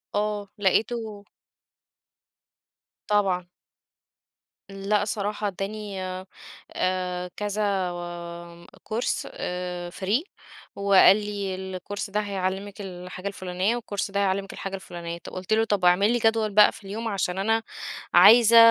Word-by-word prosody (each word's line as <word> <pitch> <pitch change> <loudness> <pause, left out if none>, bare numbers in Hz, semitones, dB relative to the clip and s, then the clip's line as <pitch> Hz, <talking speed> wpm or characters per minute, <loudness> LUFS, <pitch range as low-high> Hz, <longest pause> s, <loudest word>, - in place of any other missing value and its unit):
آه 210 -1 -1
لقيته 210 +1 0 1.8
طبعًا. 195 -4 +2 1.2
لأ 200 +1 0
صراحة، 205 0 -2
ادّاني 200 +1 -5 0.7
آآ 180 -1 -1
كذا 210 0 -2 1.2
كورس 225 +3 -2
آآ 180 -1 -4
free، 200 - 0 0.5
وقال 200 0 +6
لي: 205 -2 -3
"الكورس 190 +2 -5
ده 210 +2 0
هيعلّمِك 195 0 -3
الحاجة 180 0 -7
الفُلانيّة، 190 +2 -1
والكورس 205 -4 -3
ده 200 - 0
هيعلّمِك 195 0 0
الحاجة 195 0 -5
الفُلانيّة." 170 -3 -7
طب - - -11
قلت 185 +3 -2
له: 220 +1 +4
"طب 205 -4 0
واعمل 180 +5 +5
لي 240 - +1
جدول 225 -1 +2
بقى 210 +1 +7
في - - -14
اليوم، 215 +4 -4
عشان 195 -3 -1
أنا 225 +3 +1 0.5
عايزة 230 +1 +8
200 Hz, 115 wpm, -25 LUFS, 185-210 Hz, 1.8 s, عايزة